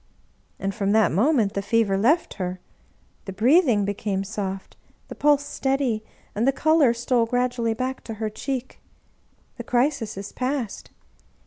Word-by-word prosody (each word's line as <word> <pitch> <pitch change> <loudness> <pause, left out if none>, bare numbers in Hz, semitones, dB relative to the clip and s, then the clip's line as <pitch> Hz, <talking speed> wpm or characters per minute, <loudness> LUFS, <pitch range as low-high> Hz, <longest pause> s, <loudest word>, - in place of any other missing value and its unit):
" - - -40
And 195 0 -2
from 200 -2 0
that 220 -4 +4
moment 220 - +2
the 200 - -1
fever 205 -1 +1
left 265 - +2
her; 180 0 -3 0.7
the 195 - -5
breath 270 - +4
ing 205 -5 +2
became 200 -1 -2
soft, 195 -2 -5 0.3
the - - -6
pulse 290 -1 +2
steady, 265 -6 -1 0.3
and 225 +5 0
the - - +6
color 310 -2 +3
stole 235 0 +1
gradually 245 -2 0
back 255 +2 -3
to 225 - -6
her 220 0 -3
cheek. 260 +3 -5 0.8
The - - -6
crisis 245 -4 0
is 200 +1 -6
past. 255 -4 -3
230 Hz, 155 wpm, -24 LUFS, 205-265 Hz, 0.8 s, the